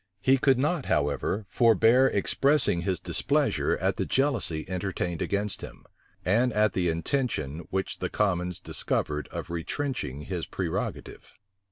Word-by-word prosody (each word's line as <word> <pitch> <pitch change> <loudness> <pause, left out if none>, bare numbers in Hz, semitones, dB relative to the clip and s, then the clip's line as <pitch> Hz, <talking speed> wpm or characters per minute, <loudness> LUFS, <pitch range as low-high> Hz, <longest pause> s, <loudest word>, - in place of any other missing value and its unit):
He 130 +6 +3
could 135 -1 +4
not, 150 +2 0
however, 75 +8 0
forbear 115 +4 +5
expressing 135 - +2
his 90 0 -1
displeasure - - +1
at - - 0
the - - -1
jealousy 120 - 0
entertained 90 -2 -3
against 100 0 -2
him, - - -10 0.4
and 120 +7 +3
at 105 -2 +2
the 90 -2 +1
intention 80 - -2
which 95 -1 -2
the - - -2
commons 90 -4 0
discovered 75 -1 -2
of 85 - -7
retrenching 85 - -3
his 90 -2 -4
prerogative. 90 -4 -4
95 Hz, 135 wpm, -27 LUFS, 85-125 Hz, 0.4 s, forbear